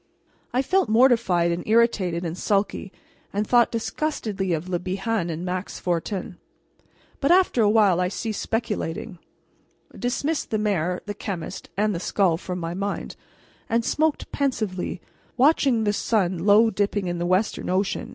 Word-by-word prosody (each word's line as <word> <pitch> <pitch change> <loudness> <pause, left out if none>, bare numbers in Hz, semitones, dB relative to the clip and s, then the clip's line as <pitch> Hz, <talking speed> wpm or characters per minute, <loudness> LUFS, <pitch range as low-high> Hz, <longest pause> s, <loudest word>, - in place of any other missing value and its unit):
I 255 +2 +1
felt 375 - +1
mortified 220 -8 +4
and 170 +1 -2
irritated 205 -6 +2
and 165 0 -3
sulky, 195 0 -1 0.4
and 205 +2 -1
thought 240 +1 +4
disgustedly 225 - -2
of 165 +1 -2
Le 180 -1 -1
Bihan 190 +1 -2
and 165 +2 -4
Max 185 +1 -4
Fortin. 175 +1 -3 0.8
But 275 - +1
after 360 -9 +4
a 210 - +4
while 205 -5 +4
I 180 - +2
ceased 215 +3 -4
speculating, 215 -4 -3 0.8
dismissed 280 +5 -2
the 215 - 0
mayor, 180 -4 0
the 205 - -4
chemist, 195 -4 -6
and 210 +1 +2
the 170 - -3
skull 180 -2 +1
from 180 +1 -5
my 165 -1 -4
mind, 200 +2 -4 0.5
and 230 0 +1
smoked 310 -1 0
pensively, 215 -10 -2 0.4
watching 265 -4 +4
the 205 -1 +1
sun 190 -4 0
low 220 +2 +6
dipping 205 0 0
in 175 -1 -2
the 175 - -1
western 185 +4 0
ocean. 190 +2 -1
205 Hz, 150 wpm, -24 LUFS, 180-230 Hz, 0.8 s, low